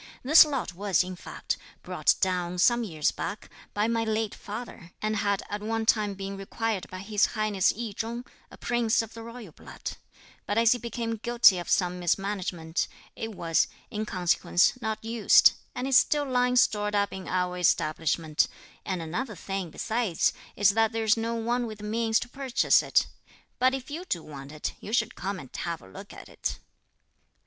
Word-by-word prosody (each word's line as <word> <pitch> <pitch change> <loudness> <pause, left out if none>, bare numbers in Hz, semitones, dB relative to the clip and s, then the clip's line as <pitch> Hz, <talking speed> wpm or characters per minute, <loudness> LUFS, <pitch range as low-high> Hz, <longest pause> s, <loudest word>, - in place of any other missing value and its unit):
This 300 +6 +9
lot 275 -10 -3
was, 195 +1 +1
in 185 0 -6
fact, - - -4 0.3
brought - - +2
down, 180 -2 0
some 240 +6 +4
years 160 -8 0
back, 205 +1 -6 0.2
by 210 +1 +2
my 230 0 +1
late 220 -1 -1
father; 205 -4 -8
and 215 0 -1
had 200 -1 0
at 205 0 -4
one 225 +1 -1
time 210 -3 +2
been 195 0 -5
required 205 +1 -3
by 185 0 -7
His 210 +1 +2
Highness 210 -3 +2
I 230 -2 -3
Chung, 235 +3 -4 0.2
a - - -13
Prince 235 -2 +1
of 225 0 -10
the 230 - -9
royal 230 -4 -9
blood; - - -8 0.5
but 205 +3 -1
as 230 0 +5
he 245 - +2
became 230 -1 -3
guilty 235 -4 +5
of 175 - -6
some 180 -1 +1
mismanagement, 180 -2 -1 0.3
it 225 -2 -5
was, 165 -2 +2 0.2
in 215 +1 -3
consequence, 175 -1 +2
not 220 0 -3
used, 230 -1 +6 0.2
and 250 +1 -2
is 270 -2 +7
still 295 -1 +1
lying 250 -1 +2
stored 210 -4 +3
up 200 0 +1
in 190 -1 -7
our 180 -1 0
establishment; 155 -2 +1 0.4
and 185 -4 -3
another 210 +8 -4
thing 195 0 -4
besides 220 +1 0 0.2
is 205 0 +5
that 225 +2 +2
there's 225 -1 +3
no 230 +1 -2
one 235 +1 -1
with 215 -1 -7
the 210 - -11
means 225 +1 +1
to - - -5
purchase 265 0 +2
it. - - +2 0.5
But 260 +1 +4
if 265 +1 -7
you 335 +5 -5
do 170 - -2
want 140 -2 -9
it, 155 0 -4
you 215 - -8
should 225 -3 +1
come 195 +2 -4
and 130 -6 -12
have 170 -1 -3
a - - -16
look 95 - -11
at - - -11
it." - - -4
210 Hz, 185 wpm, -27 LUFS, 185-230 Hz, 0.5 s, This